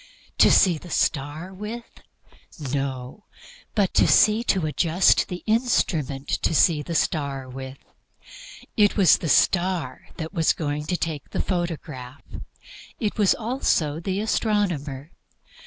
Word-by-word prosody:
To - - +7
see 175 -5 +4
the 175 - -12
star 155 +5 -2
with? 215 +5 -7 0.9
No; 135 +5 -4 0.5
but 200 -3 +1
to 215 -5 +3
adjust 165 +4 +2
the 180 -1 -7
instrument 165 - 0
to 165 - 0
see 155 -1 +4
the 170 +3 -5
star 140 -4 -1
with. 130 +1 -8 1.0
It 205 -1 +3
was 190 -5 +5
the 160 - -3
star 175 -6 +1
that 160 +1 -6
was 165 -4 +2
going 150 -1 -3
to 180 - -1
take 155 -5 -4
the - - -4
photograph; 155 -8 -4 0.8
it 215 -1 -2
was, 205 -3 +4
also, 215 - -1
the 190 +3 -3
astronomer. 175 - -1
165 Hz, 125 wpm, -24 LUFS, 145-195 Hz, 1.0 s, To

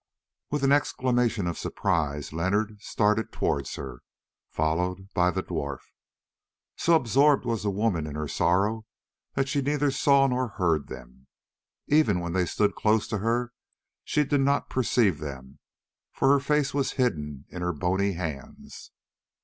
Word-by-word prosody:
With 145 -1 -2
an 135 - +4
exclamation 125 -7 +1
of 85 -1 -3
surprise 75 -7 -1
Leonard 100 +5 -1
started 105 0 0
towards 70 -1 -2
her, 60 -3 -8 0.5
followed 90 +5 -2
by 90 -2 +3
the 95 +1 -2
dwarf. 70 -6 -4 0.9
So 170 - +3
absorbed 140 +1 +3
was 115 -2 -1
the 105 - -1
woman 100 -6 0
in 75 - -6
her 75 0 -3
sorrow 105 +8 +1 0.5
that 135 0 +1
she 140 +1 0
neither 145 +1 +1
saw 140 0 +4
nor 130 -1 0
heard 80 -6 +1
them. 65 +2 -12 0.6
Even 145 -11 +3
when 85 -1 -4
they 90 -1 +1
stood 105 +4 +1
close 110 0 +1
to 110 -2 -2
her 120 +3 -1 0.5
she 150 - +1
did 145 -1 +1
not 140 +1 +1
perceive 115 - +2
them, 65 -3 -8 0.5
for 135 - +1
her 140 - +5
face 145 0 0
was 135 -2 0
hidden 75 - -2
in 90 - -7
her 90 0 0
bony 95 +5 0
hands. 80 -7 -7
100 Hz, 150 wpm, -26 LUFS, 85-130 Hz, 0.9 s, her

